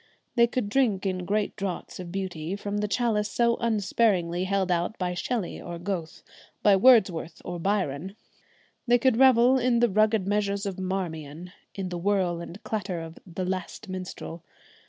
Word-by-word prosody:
They 235 -1 +5
could 240 -2 -2
drink 210 -4 +1
in 185 -2 -1
great 210 0 0
draughts 195 -2 -5
of 175 -2 -7
beauty 185 -2 -3
from 205 0 -4
the 210 - 0
chalice 210 0 0
so 235 +1 +2
unsparingly 200 -5 +1
held 190 -1 0
out 175 +4 0
by 180 -1 -1
Shelley 200 +2 -3
or 175 0 -6
Goethe, 175 -2 -5 0.4
by 205 -1 +6
Wordsworth 190 -7 +4
or 175 0 -4
Byron. 190 -2 -1 0.7
They 240 0 +6
could 245 -1 +2
revel 260 0 +6
in 245 -1 +2
the 240 0 +4
rugged 215 0 +3
measures 200 0 0
of 195 -2 -4
'Marmion,' 175 -3 -4 0.2
in 190 -2 -3
the 175 -1 -4
whirl 185 -2 +1
and 170 +4 -9
clatter 195 -5 -3
of 165 0 -9
the 185 +2 -3
'Last 185 +3 -4
Minstrel.' 180 -3 -6
195 Hz, 165 wpm, -27 LUFS, 175-215 Hz, 0.7 s, by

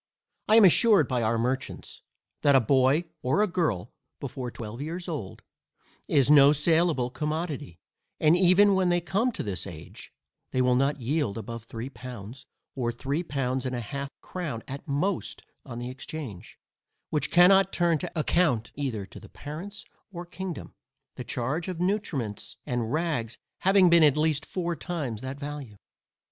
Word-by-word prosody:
I 215 - +5
am 225 -3 +8
assured 195 - +5
by 125 -2 0
our 115 +1 +1
merchants, 130 +3 -3 0.4
that 140 -1 +5
a - - +8
boy 130 +6 +3 0.2
or 135 +12 +2
a - - +2
girl, 160 - -1 0.3
before 125 -2 -5
twelve 115 +1 -7
years 170 +4 -5
old, 145 - -6 0.6
is 140 -3 +3
no 145 -1 +8
saleable 155 -4 +2
commodity, 150 - -4 0.4
and 155 +2 +5
even 185 +3 +5
when 190 -1 +2
they 175 0 +3
come 200 +8 0
to - - -4
this 100 -2 -4
age, 80 -4 -10 0.4
they 130 - -2
will 125 0 +3
not 135 +3 +1
yield 130 -3 -1
above 115 0 -7
three 115 +1 -6
pounds, 125 -2 -9 0.3
or 120 -3 -1
three 140 +6 -2
pounds 130 -5 -2
and 130 -1 -3
half 140 +4 -4
a - - -21
crown 155 -11 -5
at 140 +3 -7
most, 155 +7 -2 0.2
on 120 -3 -7
the 120 +1 -5
exchange; 130 - -8 0.5
which 150 - 0
cannot 190 +2 +6
turn 170 -3 +2
to 180 - -5
account 145 -8 +1
either 125 -8 -3
to - - -12
the - - -14
parents 170 +8 -8 0.3
or 175 -1 -7
kingdom, 185 -1 -7 0.4
the - - -7
charge 150 +9 -3
of 185 -2 -4
nutriments 175 - -2
and 120 -2 -2
rags 150 -8 -1 0.2
having 190 -1 +5
been 170 -1 +6
at 150 -1 +5
least 155 -1 +1
four 175 -2 -2
times 145 - -4
that 130 +2 -6
value. 145 -6 -7
145 Hz, 165 wpm, -27 LUFS, 125-175 Hz, 0.6 s, am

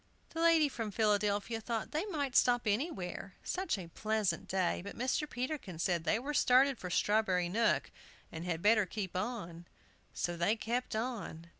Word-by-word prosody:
The 330 - -3
lady 330 -2 +5
from 230 -5 -4
Philadelphia 210 +1 +1
thought 225 0 -3
they 320 +7 -1
might 285 -9 -2
stop 245 -1 +4
anywhere, 200 - -2
such 365 - -1
a 185 - -6
pleasant 210 0 -1
day, 185 -2 0
but 200 - -8
Mr. 260 +4 0
Peterkin 245 - -4
said 170 0 0
they 215 - +3
were 275 +6 -4
started 265 -1 +4
for 180 - -5
Strawberry 185 -2 +2
Nook, 225 +5 +1 0.4
and 165 0 -6
had 170 -2 -3
better 210 -1 +5
keep 190 -1 -5
on, 180 -5 -4 0.4
So 175 - -2
they 175 +6 +2
kept 235 +1 -2
on. 220 -8 -4
215 Hz, 165 wpm, -33 LUFS, 185-250 Hz, 0.4 s, lady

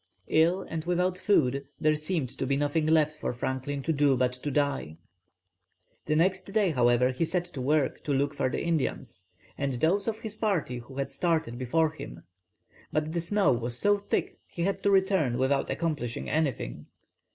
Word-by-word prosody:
Ill 170 +4 +3
and 160 -1 -5
without 180 +1 +1
food, 140 - +2 0.2
there 155 0 +3
seemed 155 -4 -2
to 135 - -3
be 140 +1 +1
nothing 150 +2 0
left 155 -1 +2
for - - -2
Franklin 130 +3 -3
to 160 - 0
do 140 -2 +3
but 125 0 +1
to 125 +3 -5
die. 140 - -1 1.1
The 155 - +1
next 185 +3 +1
day, 205 -4 +2
however, 125 -1 +3
he 130 - -1
set 175 +2 0
to 150 -7 -7
work 145 +1 +1
to 150 - -1
look 140 +1 +1
for - - 0
the - - -3
Indians, 130 - -2 0.3
and 140 -1 -1
those 175 - +1
of 220 -1 -1
his 220 -2 -5
party 185 - -1
who 125 +3 -12
had 140 0 -2
started 160 -9 -1
before 155 +5 +1
him, - - -9 0.7
but 155 +1 -1
the 170 - 0
snow 200 +1 +2
was 120 0 0
so 205 +9 +4
thick 200 - -2
he 170 - -4
had 195 +2 -1
to 200 - +2
return 190 -10 +2
without 135 +2 +1
accomplishing 150 -8 -2
anything. 140 - -2
150 Hz, 185 wpm, -28 LUFS, 130-175 Hz, 1.1 s, so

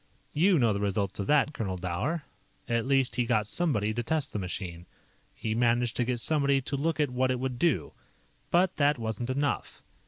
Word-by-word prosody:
"You 180 +4 +4
know 115 -6 +3
the 100 - -2
results 100 -1 -1
of 100 - -2
that, 150 0 +3
Colonel 95 -8 -3
Dower. 95 - -2 0.4
At 115 +1 0
least 135 -2 +2
he 125 - +3
got 110 -3 +1
somebody 110 - 0
to 120 - -1
test 150 +3 -1
the 105 - -2
machine. 90 -2 -5 0.5
He 110 - -2
managed 120 +1 +2
to 125 - +2
get 125 0 -1
somebody 140 -1 +2
to 135 +2 -3
look 155 +3 -1
at 145 -4 +1
what 130 +1 +1
it 130 -1 0
would 130 -1 -3
do. 165 -4 +1 0.6
"But 180 +1 +2
that 145 0 +3
wasn't 115 +1 -3
enough. 140 +2 -2
125 Hz, 195 wpm, -29 LUFS, 110-145 Hz, 0.6 s, You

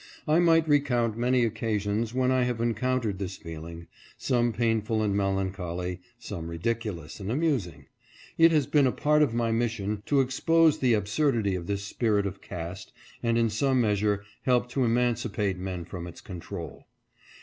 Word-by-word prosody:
I 155 +2 +4
might 165 -2 +4
recount 125 -7 +2
many 125 +1 +2
occasions 110 0 -1
when 130 +1 +1
I 130 0 +3
have 125 -1 0
encoun 120 +2 0
tered 100 -4 -2
this 95 -1 -4
feeling, 85 +1 -8 0.3
some 120 -2 +1
painful 115 -1 0
and 100 -2 0
melancholy, 95 -2 -2 0.2
some 100 -8 -6
ridiculous 95 -1 -3
and 100 +1 -4
amusing. 120 - -1 0.5
It 165 0 +6
has 150 -4 +3
been 145 -1 +3
a - - +2
part 150 +3 +2
of 135 -6 +2
my 115 -1 +1
mis 115 0 +1
sion 105 -1 -3
to 145 - +3
expose 155 +5 +3
the 125 -3 +3
absurdity 105 0 +1
of 90 -2 -4
this 100 -1 -2
spirit 105 -1 0
of 95 -1 -5
caste 90 +1 -7 0.3
and 115 -1 +1
in 115 -1 +2
some 130 +4 +1
measure 105 -2 +1 0.2
help 125 -1 +1
to 130 +1 0
emancipate 115 -5 0
men 90 -2 -4
from 85 0 -7
its 85 - -10
control. 90 -4 -8
115 Hz, 170 wpm, -27 LUFS, 95-125 Hz, 0.5 s, It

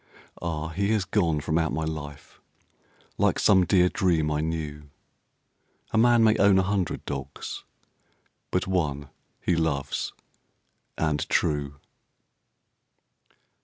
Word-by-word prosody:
Ah! 80 -2 -3
He 100 +5 -1
has 105 -4 +1
gone 85 -7 +1
from 80 +2 0
out 80 -3 0
my 80 +4 -2
life 75 -3 -7 0.8
Like - - +3
some 95 -3 +4
dear 90 0 +4
dream 85 -5 +1
I 75 0 0
knew. 75 -2 -4 1.0
A - - 0
man 120 0 +5
may 110 -1 +5
own 100 -1 +5
a 95 - +4
hundred 95 -2 -2
dogs, 70 -1 -6 0.9
But - - 0
one 75 -7 -1 0.3
he 90 - +1
loves, 80 -5 -1 0.9
and 75 -2 -1
true. 70 -2 0
80 Hz, 120 wpm, -26 LUFS, 75-95 Hz, 1.0 s, man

